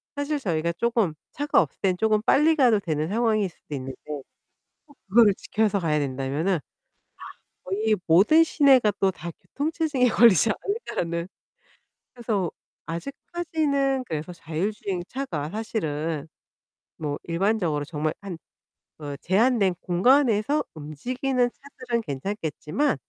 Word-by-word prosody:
사실 285 +1 -1
저희가 170 -6 -1
쪼금 230 -4 +1 0.2
차가 290 +1 +3
없을 - - -5
땐 185 -2 +1
쪼금 215 0 +2
빨리 310 +6 +4
가도 240 -7 +4
되는 155 -4 -2
상황일 215 -3 +1
수도 150 -3 -9
있는데 130 0 -6 0.9
꼭 285 - -21
그거를 215 -1 +6
지켜서 215 -2 0
가야 155 -3 +1
된다면은 140 +6 -1 1.1
거의 215 +3 +1
모든 205 - +6
시내가 270 -9 +5
또 195 -1 +3
다 170 -1 -7
교통 295 +3 -3
체증에 300 -7 +1
걸리지 220 -4 +5
않을까라는 175 - -3 0.9
그래서 215 -8 -1 0.4
아직까지는 280 - -1
그래서 160 -1 -5
자율주행차가 175 - -4
사실은 165 -8 -3 0.7
뭐 145 -2 -3
일반적으로 170 -4 0
정말 155 0 -2
한 190 -5 -7 0.6
그 145 -2 -6
'제한된 200 0 +3
공간에서 245 +7 +3
움직이는 245 - -1
차들은 250 -3 -5
괜찮겠지만 165 - -2
205 Hz, 290 characters per minute, -25 LUFS, 165-255 Hz, 1.1 s, 그거를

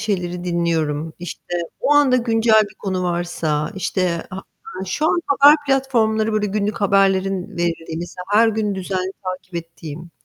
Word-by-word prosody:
şeyleri 180 -4 -2
dinliyorum. 165 -3 -1
İşte, 175 0 -7 0.3
o 295 - +2
anda 285 -3 +5
güncel 225 -2 +4
bir - - -17
konu 190 -2 -3
varsa, 170 -3 -1
işte, 180 -3 -1
ha 185 - -6 0.4
aaa, 190 - -4
şu 300 +11 -1
an 345 - +2
haber 285 +1 +7
platformları, 230 -5 +1
böyle, 215 -1 +1
günlük 205 +1 -2
haberlerin 195 -1 +2
verildiği 165 -1 -2
mesela, 175 +1 -7
her 225 +2 +6
gün 215 -2 -1
düzenli 190 0 -3
takip 185 -1 -6
ettiğim. 165 0 -7
190 Hz, 150 wpm, -20 LUFS, 175-220 Hz, 0.4 s, haber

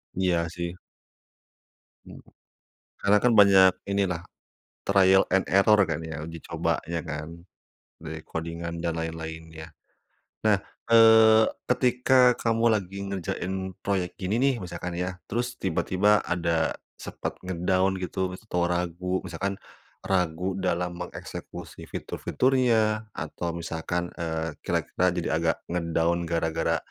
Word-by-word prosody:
Iya 90 -3 +1
sih. 85 +1 -4 1.3
Mmm. - - -11 0.8
Karena 105 +1 +5
kan 125 -1 +4
banyak 95 -3 +7 0.2
inilah, 95 -4 0 0.6
trial 95 -1 +5
and 95 0 +3
error 100 +2 +5
kan 80 -1 -2
ya, 80 -1 -6
uji 85 -1 -8
cobanya 85 0 -2
kan 75 0 -5 0.7
dari 80 -1 -6
codingan 85 +1 -5
dan 85 -1 -1
lain-lainnya. 80 0 -6 0.7
Nah, 105 -2 +5 0.3
eee, 110 -1 +7 0.2
ketika 125 0 +4
kamu 115 0 +1
lagi 100 -2 -1
ngerjain 95 0 -3
proyek 95 -3 -1
gini 100 +5 0
nih, 135 -1 +3
misalkan 85 0 -5
ya, 90 +1 -3
terus 120 +3 -2
tiba-tiba 95 +3 +2
ada 85 -2 0 0.2
sepet - - -5
nge-down 95 +1 +1
gitu 90 +1 -2
mis 90 - -8
atau 90 -3 0
ragu, 90 +1 -1
misalkan 95 +3 -3 0.5
ragu 90 -1 0
dalam 90 -1 -1
mengeksekusi 90 - -8
fitur-fiturnya 115 -4 +1
atau 85 - -5
misalkan, 85 +1 -3
eee, 80 -2 -3
kira-kira 90 +1 0
jadi 85 -1 -2
agak 80 0 +1
nge-down 85 0 0
gara-gara 80 -1 0
90 Hz, 115 wpm, -26 LUFS, 85-100 Hz, 1.3 s, banyak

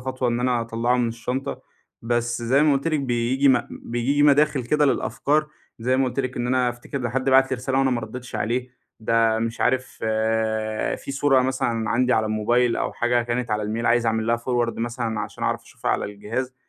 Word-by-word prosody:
خطوة 130 0 -2
إن 120 0 0
أنا 125 -1 +1
أطلّعه 115 +2 0
من 120 -1 +1
الشنطة، 125 +4 -4 0.4
بس 120 0 -1
زي 130 +5 +3
ما 155 - +4
قُلت 140 +3 0
لِك 155 -2 0
بييجي 130 +2 +1
م 125 -2 +4
بييجي 125 +5 -1
مداخل 145 -2 +4
كده 150 +4 +2
للأفكار 150 +2 +1 0.3
زي 125 +3 +1
ما 135 - +2
قُلت 130 +1 -1
لِك 130 -1 -4
إن 120 - -1
أنا 125 0 +2
أفتكر 120 +3 -5
إن 125 -2 -2
حد 130 +3 -1
بعت 135 0 +5
لي 130 - 0
رسالة 130 +2 -1
وأنا 135 0 +3
ما 120 -2 0
ردّيتش 120 +3 -8
عليه، 125 +3 -2 0.3
ده 115 0 +2
مش 115 +1 -3
عارف 130 0 +2 1.1
في - - -7
صورة 135 -1 +3
مثلًا 120 -4 -1
عندي 125 +2 +2
على 110 -1 +2
الموبايل 115 +3 +1
أو - - -2
حاجة 120 0 +1
كانت 120 +1 -2
على 105 0 0
الميل 110 +3 -2
عايز 120 0 +3
أعمل 110 0 0
لها 120 0 +2
forward 120 0 -1
مثلًا 115 -1 -2
عشان 105 0 -5
اعرف - - -1
أشوفها - - -4
على - - 0
الجهاز، 105 +6 -4
120 Hz, 205 wpm, -23 LUFS, 115-130 Hz, 1.1 s, بعت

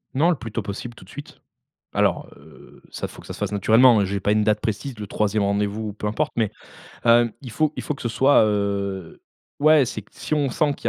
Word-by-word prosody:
Non, 160 +6 +3
le 175 - +3
plus 115 -6 -8
tôt 115 - -2
possible, 105 +4 -6
tout 95 - -14
de 95 - -20
suite. 145 - -11 0.5
Alors, - - +1
heu, 75 +3 -17
ça, - - -5
faut - - -13
que - - -15
ça - - -6
se - - -10
fasse 105 -1 -2
naturellement, 110 +4 +5
heu, - - +1
j'ai 100 +1 -2
pas 100 +2 0
une 105 0 +3
date 105 0 +1
précise, 115 +4 -3
le 105 - -6
3e 105 0 0
rendez-vous 105 +2 -1
ou - - -7
peu 105 0 -4
importe, 150 +8 -1
mais, 110 -4 0 0.5
hem, 115 -1 +5
il 125 - -9
faut 155 +5 0
il - - -4
faut 150 - -3
que - - -11
ce 120 - -1
soit, 130 +3 +4
heu, 100 -4 -2 0.4
ouais, 155 -1 +5
c'est 110 - -6
si - - -8
on 145 -2 +1
sent 145 +2 +1
qu'il 120 - -3
110 Hz, 250 wpm, -23 LUFS, 100-130 Hz, 0.5 s, naturellement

